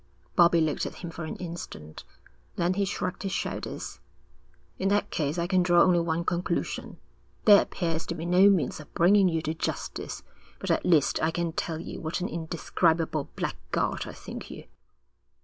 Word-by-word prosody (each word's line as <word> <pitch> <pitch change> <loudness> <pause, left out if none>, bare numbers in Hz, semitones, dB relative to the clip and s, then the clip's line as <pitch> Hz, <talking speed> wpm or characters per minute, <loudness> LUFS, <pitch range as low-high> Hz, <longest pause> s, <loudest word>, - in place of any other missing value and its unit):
Bobbie 170 -1 +6
looked 155 -2 0
at - - -8
him 170 - -5
for 160 0 -6
an 155 - -5
instant. 165 - -8 0.5
Then 175 +1 +1
he 200 +1 +1
shrugged 185 -2 -3
his 195 -1 -3
shoulders. - - -4 0.8
'In 195 - +1
that 205 +1 +1
case 150 +1 -1
I 170 - 0
can 185 0 +3
draw 175 -1 +5
only 180 -2 +4
one 170 0 -1
conclusion. 175 0 -2 0.5
There 205 -2 +9
appears 165 -3 -2
to - - -3
be 165 - -5
no 180 +3 +6
means 170 -10 +1
of 150 - -12
bringing 190 +2 +5
you 165 -1 -1
to 155 - -1
justice, 160 - -4 0.3
but - - -2
at - - +1
least 160 -6 +3
I 160 - +3
can 170 0 -1
tell 165 -1 -2
you 170 - -7
what 160 0 -2
an 180 - -2
indescribable 160 -1 0
blackguard - - -2
I - - -7
think - - -8
you.' - - -9
170 Hz, 180 wpm, -27 LUFS, 160-180 Hz, 0.8 s, There